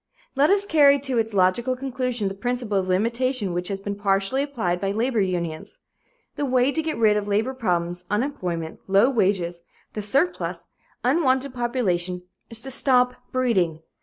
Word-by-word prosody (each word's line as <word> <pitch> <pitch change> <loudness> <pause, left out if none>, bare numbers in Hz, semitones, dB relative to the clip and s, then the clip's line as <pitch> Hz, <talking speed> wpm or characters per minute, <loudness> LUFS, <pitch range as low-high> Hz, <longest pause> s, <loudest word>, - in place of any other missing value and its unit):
Let 280 +2 +4
us 400 +1 +4
carry 290 -6 +5
to 265 -3 -1
its 225 0 -1
logical 205 +6 +2
conclusion 250 -4 -2
the 195 - -3
principle 240 -1 -1
of 185 - -3
limitation 230 +2 0
which 180 +1 -2
has 195 -1 -3
been 200 +1 -4
partially 200 +5 0
applied 220 -12 -2
by 195 - 0
labor 230 +2 0
unions. 175 - -3 0.6
The - - -1
way 255 0 +2
to 320 - -1
get 315 -4 -3
rid 215 -2 +4
of 205 -1 -3
labor 215 +6 0
problems, 175 -7 -2
unemployment, 180 - -3
low 200 +7 +4
wages, 185 -7 0 0.3
the 210 - -4
surplus, 275 - -1 0.4
unwanted 265 -1 +1
population, 185 -8 -1 0.3
is 230 -1 -2
to 270 - -4
stop 250 -1 +4 0.2
breeding. 185 -11 0
225 Hz, 165 wpm, -24 LUFS, 190-260 Hz, 0.6 s, carry